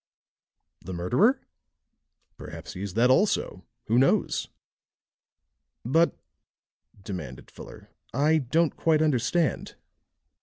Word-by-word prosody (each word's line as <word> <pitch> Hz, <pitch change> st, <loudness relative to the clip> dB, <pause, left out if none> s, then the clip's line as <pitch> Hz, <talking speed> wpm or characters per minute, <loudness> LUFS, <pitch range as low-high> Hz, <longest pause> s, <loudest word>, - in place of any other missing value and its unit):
"The 95 Hz, -, -6 dB
murderer?" 180 Hz, -, +2 dB, 0.9 s
"Perhaps -, -, -9 dB
he 90 Hz, -, -8 dB
is 100 Hz, -1 st, -5 dB
that 125 Hz, +3 st, +4 dB
also 195 Hz, +10 st, +1 dB, 0.2 s
who 115 Hz, +3 st, +2 dB
knows?" 135 Hz, -, +1 dB, 1.4 s
"But," 165 Hz, +7 st, +2 dB, 0.9 s
demanded 85 Hz, -, -8 dB
Fuller, -, -, -13 dB, 0.2 s
"I 150 Hz, +4 st, +2 dB
don't 155 Hz, +4 st, 0 dB
quite 155 Hz, -1 st, +2 dB
understand." 155 Hz, +3 st, 0 dB
130 Hz, 90 wpm, -26 LUFS, 100-160 Hz, 1.4 s, that